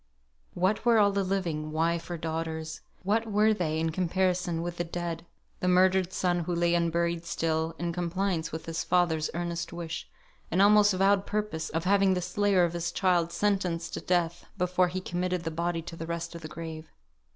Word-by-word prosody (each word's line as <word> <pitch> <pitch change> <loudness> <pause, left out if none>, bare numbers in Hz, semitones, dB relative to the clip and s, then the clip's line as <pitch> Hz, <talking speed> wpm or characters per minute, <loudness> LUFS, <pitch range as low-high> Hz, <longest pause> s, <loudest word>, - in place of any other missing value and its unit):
What 190 +4 +1
were 235 -1 +5
all 205 -1 +5
the 200 0 0
living, 170 -5 -2
wife 165 +2 0
or 175 - -3
daughters, 160 0 -4 0.2
what 220 +3 0
were 210 +1 +4
they 160 -6 -1
in 160 0 0
comparison 180 -1 0
with 175 0 -4
the 175 - 0
dead, 170 0 -5 0.3
the 180 - -1
murdered 185 0 +4
son 180 -1 +1
who 175 +1 -2
lay 170 0 +2
unburied 170 0 +1
still, 160 -1 -1
in 170 0 -2
compliance 175 -1 -1
with 160 0 -6
his 165 -1 -3
father's 165 -4 +2
earnest 170 0 -3
wish, 170 -1 -6 0.4
and 175 - 0
almost 205 0 +6
vowed 195 +1 +3
purpose 210 -7 -2
of 165 0 -2
having 195 0 +4
the 180 - -1
slayer 200 -1 +2
of 170 -1 +1
his 170 0 -2
child 175 -2 +2
sentenced 180 -4 0
to - - -3
death, 175 -1 0
before 180 0 +2
he 185 +1 -4
committed 180 -1 -2
the 165 - -3
body 170 +1 -2
to 165 - -8
the 165 0 -6
rest 170 0 -4
of 170 - -8
the 155 - -6
grave? 160 0 -8
175 Hz, 190 wpm, -28 LUFS, 165-185 Hz, 0.4 s, almost